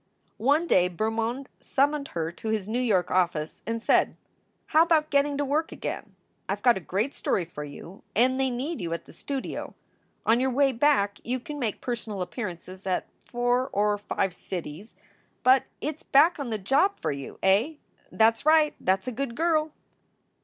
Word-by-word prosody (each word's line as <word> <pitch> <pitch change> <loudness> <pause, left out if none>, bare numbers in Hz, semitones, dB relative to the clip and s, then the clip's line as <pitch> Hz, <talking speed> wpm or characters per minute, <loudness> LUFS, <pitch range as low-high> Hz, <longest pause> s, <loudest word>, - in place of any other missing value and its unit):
One 285 +9 +3
day 180 - +3
Bermond 225 +7 -2
summoned 280 +1 +1
her 165 -1 -1
to 200 - -9
his 215 -3 -1
New 230 +3 -1
York 200 -8 +1
office 170 -4 0
and 230 0 -2
said: - - +3 0.6
"How 315 - +7
about 315 -2 +3
getting 285 0 +2
to 290 - 0
work 300 +4 0
again? - - -6 0.3
I - - +1
ve - - -22
got 245 -2 +6
a - - -3
great 200 +9 -2
story 180 - -1
for 155 -3 -7
you 150 +6 -10
and 255 +3 +3
they 265 0 +2
need 255 - -3
you 170 -1 -2
at 170 - -5
the - - -15
studio. 270 - -5 0.5
On 230 +2 +4
your 265 +1 +2
way 270 +2 +3
back 235 -6 +2
you 255 +2 -2
can 295 +4 -7
make 225 -6 -2
personal 225 -6 -3
appearances 185 -1 -7
at 185 - 0 0.2
four 245 +2 0
or 205 +1 +2
five 195 -2 -1
cities, 180 +2 -7 0.5
but 260 +1 +5 0.2
it 305 0 -3
s - - -25
back 315 +5 +4
on 275 -4 -3
the 220 - -1
job 275 - +2
for - - -1
you, 140 -1 -7
eh? 205 +11 +3 0.4
That 225 +1 +5
s 225 - -13
right! 310 0 +5
That 190 +1 +1
s - - -19
a - - -1
good 245 0 -4
girl!" 315 -1 +1
240 Hz, 190 wpm, -27 LUFS, 190-280 Hz, 0.6 s, How